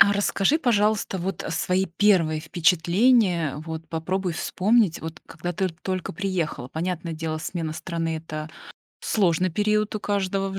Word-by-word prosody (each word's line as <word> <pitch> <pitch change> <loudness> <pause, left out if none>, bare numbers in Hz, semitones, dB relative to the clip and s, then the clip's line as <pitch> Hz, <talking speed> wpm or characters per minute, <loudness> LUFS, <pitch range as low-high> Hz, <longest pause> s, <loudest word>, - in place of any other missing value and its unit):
А, 200 +3 +8
расскажи, 205 +7 +2
пожалуйста, 215 -7 +1
вот, 190 +2 -3
э, - - -5
свои 180 +3 +1
1 170 -4 +2
впечатления, 175 - +3
вот 160 0 -6
попробуй 180 +3 -2
вспомнить, 195 +2 +2
вот 160 0 -7
когда 175 +2 -5
ты 190 +2 0
толь 185 +2 -3
только - - -6
приехала. 175 -9 -2
Понятное 170 +2 -3
дело 160 0 -3
смена 160 -1 -3
страны- 165 -1 -3
это 155 -1 -6 0.5
сложный 185 -3 +2
период 210 +4 +1
у - - -6
каждого 195 -1 -1
в 195 - -4
180 Hz, 155 wpm, -25 LUFS, 160-195 Hz, 0.5 s, А